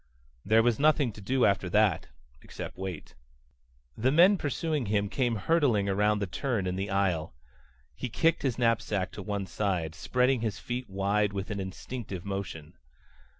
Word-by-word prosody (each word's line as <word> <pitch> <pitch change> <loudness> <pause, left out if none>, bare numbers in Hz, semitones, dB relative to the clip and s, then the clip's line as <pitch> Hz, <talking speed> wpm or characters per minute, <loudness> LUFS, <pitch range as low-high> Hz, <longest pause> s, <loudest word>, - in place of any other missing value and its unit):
There 110 +2 +4
was 120 -2 +2
nothing 150 -4 +3
to 105 - -12
do 125 +5 +2
after 100 -2 +1
that 105 -2 +2 0.3
except - - -8
wait. 95 -4 -6 0.8
The 130 +4 +1
men 175 +7 +6
pursuing 150 - -2
him 100 0 +1
came 120 -1 0
hurtling 115 - +2
around 105 +2 +2
the 100 - -1
turn 115 +1 -2
in 90 0 -1
the 95 +1 -3
aisle. 95 -9 0 0.6
He 125 - -5
kicked 165 +9 +2
his 130 -5 -1
knapsack 110 -5 0
to - - -8
one 100 -1 -3
side, 90 -6 -2
spreading 125 +8 +1
his 110 -4 -2
feet 125 -1 -5
wide 100 +2 0
with 100 +1 -4
an 100 - -3
instinctive 95 0 -6
motion. 95 -7 -6
105 Hz, 160 wpm, -29 LUFS, 95-125 Hz, 0.8 s, men